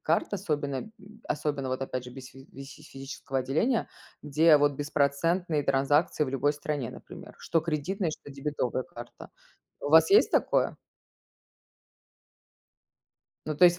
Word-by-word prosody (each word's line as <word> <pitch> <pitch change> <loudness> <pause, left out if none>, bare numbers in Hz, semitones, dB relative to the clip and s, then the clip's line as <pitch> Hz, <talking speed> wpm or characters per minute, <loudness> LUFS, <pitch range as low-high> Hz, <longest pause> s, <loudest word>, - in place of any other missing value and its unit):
карт, 165 +5 0
особенно, 150 -8 -2
м, 175 +12 -6 0.4
особенно, 145 -3 -2
вот 130 +1 -2
опять 130 -1 -4
же, 125 - -9
без 130 0 -10
фи 135 +1 -15
фи 135 +1 -11
физического 135 -1 -5
отделения, 160 - 0 0.4
где 150 +2 +5
вот 145 0 +3
беспроцентные 150 +3 0
транзакции 145 +3 +2
в 130 - -4
любой 145 +2 +1
стране, 145 -4 -3
например, - - -12
что 165 - 0
кредитная, 170 +4 -2
что 145 - -9
дебетовая 135 -2 -2
карта. 120 0 -11 0.5
У 145 - -3
вас 160 - +7
есть 415 - +6
такое? - - +1 2.7
Ну, 155 -1 -3
то 180 - +6
есть, 175 0 +6
145 Hz, 140 wpm, -28 LUFS, 135-160 Hz, 2.7 s, вас